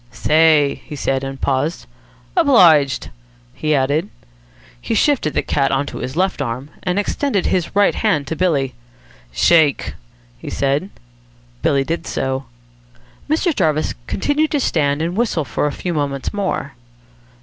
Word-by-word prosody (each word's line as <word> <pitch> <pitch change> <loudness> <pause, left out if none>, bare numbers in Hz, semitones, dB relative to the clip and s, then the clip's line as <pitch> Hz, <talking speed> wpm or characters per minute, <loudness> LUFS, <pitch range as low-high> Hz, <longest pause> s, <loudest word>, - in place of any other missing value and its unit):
"Say!" 150 +2 +3
he 150 - -8
said, 135 -1 -1
and 135 0 -6
paused. 140 - -1 0.5
"Obliged," 150 -6 +4 0.4
he 155 - 0
added. 145 +8 0 0.7
He - - -2
shifted 270 - +1
the - - +1
cat 135 -2 0
on 135 +1 +1
to - - -7
his 130 - -5
left 185 -2 0
arm, 130 +3 -4
and 180 +1 -1
extended 205 0 0
his 180 0 -1
right 205 0 +4
hand 195 -10 0
to 160 - -4
Billy. 145 -8 0 0.6
"Shake!" 145 - +3 0.5
he - - -7
said. 140 +7 -1 0.7
Billy 140 -1 +2
did 165 +5 -4
so. 130 0 -2 0.8
Mr. 320 +1 +1
Jarvis 155 -1 +1
continued 295 +7 0
to 295 - 0
stand 150 - +1
and 170 +2 -2
whistle 205 -9 0
for 130 +4 -1
a - - -2
few 175 +4 -4
moments 140 -3 -2
more. 200 -2 -2
155 Hz, 145 wpm, -19 LUFS, 140-185 Hz, 0.8 s, Obliged